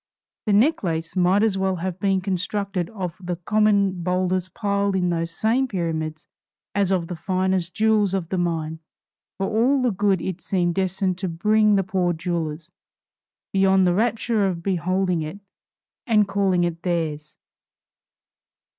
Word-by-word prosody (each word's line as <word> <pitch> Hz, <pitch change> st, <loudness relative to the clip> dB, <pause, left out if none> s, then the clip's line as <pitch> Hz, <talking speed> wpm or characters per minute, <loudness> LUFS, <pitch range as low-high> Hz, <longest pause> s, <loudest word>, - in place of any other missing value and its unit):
the 210 Hz, -, +3 dB
necklace 185 Hz, -, +1 dB
might 185 Hz, +3 st, +3 dB
as 205 Hz, -4 st, +1 dB
well 190 Hz, 0 st, +1 dB
have 180 Hz, +1 st, -4 dB
been 195 Hz, -2 st, +1 dB
constructed 190 Hz, -1 st, -2 dB
of 185 Hz, -6 st, -5 dB
the 180 Hz, -1 st, -3 dB
common 200 Hz, 0 st, +2 dB
boulders 185 Hz, +1 st, 0 dB
piled 200 Hz, +1 st, -1 dB
in 180 Hz, -2 st, +1 dB
those 165 Hz, 0 st, -1 dB
same 230 Hz, +9 st, +1 dB
pyramids 160 Hz, -5 st, -3 dB, 0.5 s
as 200 Hz, -2 st, +1 dB
of 180 Hz, -3 st, +1 dB
the 175 Hz, -, -6 dB
finest 185 Hz, 0 st, -1 dB
jewels 215 Hz, -3 st, +2 dB
of 175 Hz, -4 st, -3 dB
the 190 Hz, -, -1 dB
mine, 160 Hz, -2 st, -2 dB, 0.6 s
for 195 Hz, -, -1 dB
all 235 Hz, +7 st, +2 dB
the 250 Hz, -2 st, +2 dB
good 195 Hz, -1 st, +1 dB
it 185 Hz, +1 st, -4 dB
seemed 175 Hz, 0 st, 0 dB
destined 190 Hz, 0 st, -1 dB
to 190 Hz, -1 st, -2 dB
bring 210 Hz, +5 st, +3 dB
the 195 Hz, -, +2 dB
poor 180 Hz, -1 st, 0 dB
jewelers, 165 Hz, -1 st, -4 dB, 0.8 s
beyond 190 Hz, -1 st, +4 dB
the 175 Hz, -, +3 dB
rapture 225 Hz, 0 st, +1 dB
of 170 Hz, -3 st, -3 dB
beholding 185 Hz, -1 st, 0 dB
it 155 Hz, +6 st, -6 dB, 0.7 s
and 210 Hz, -3 st, +4 dB
calling 195 Hz, -3 st, +1 dB
it 170 Hz, -1 st, -2 dB
theirs. 155 Hz, -4 st, -3 dB
185 Hz, 150 wpm, -23 LUFS, 170-200 Hz, 0.8 s, beyond